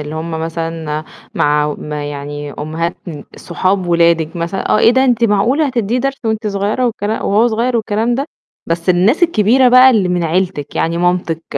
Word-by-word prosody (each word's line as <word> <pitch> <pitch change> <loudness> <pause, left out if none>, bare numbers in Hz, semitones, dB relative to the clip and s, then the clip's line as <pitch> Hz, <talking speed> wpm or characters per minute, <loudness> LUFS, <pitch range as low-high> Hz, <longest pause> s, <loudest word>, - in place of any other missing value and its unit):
اللي 150 +1 -6
هُم 160 +1 -5
مثلًا 160 -1 -4 0.3
مع 150 0 +1
ما 150 -1 -5
يعني 145 0 -6
أمهات 160 +3 -4 0.4
صحاب 185 +2 -1
ولادِك 170 -1 +2
مثلًا، 170 +3 -3
آه، - - +3
إيه 225 - +5
ده، 260 +2 +3
أنتِ 240 -3 +2
معقولة 230 +9 +2
هتديه 240 -2 -1
درس 275 +2 -1
وأنتِ 220 0 -2
صغيرة 205 +5 -1
والكلا 220 -2 -3
وهو 215 +4 +2
صغير 235 +2 0
والكلام 225 +1 -1
ده؟ 275 +4 -2 0.4
بس 170 +2 -3
الناس 190 - +3
الكبيرة 255 - +4
بقى 255 +1 +7
اللي 210 -7 +1
من 180 -1 0
عيلتِك 165 -3 -2
يعني 165 +1 -1
مامتِك، 175 -2 -1
185 Hz, 170 wpm, -15 LUFS, 165-230 Hz, 0.4 s, بقى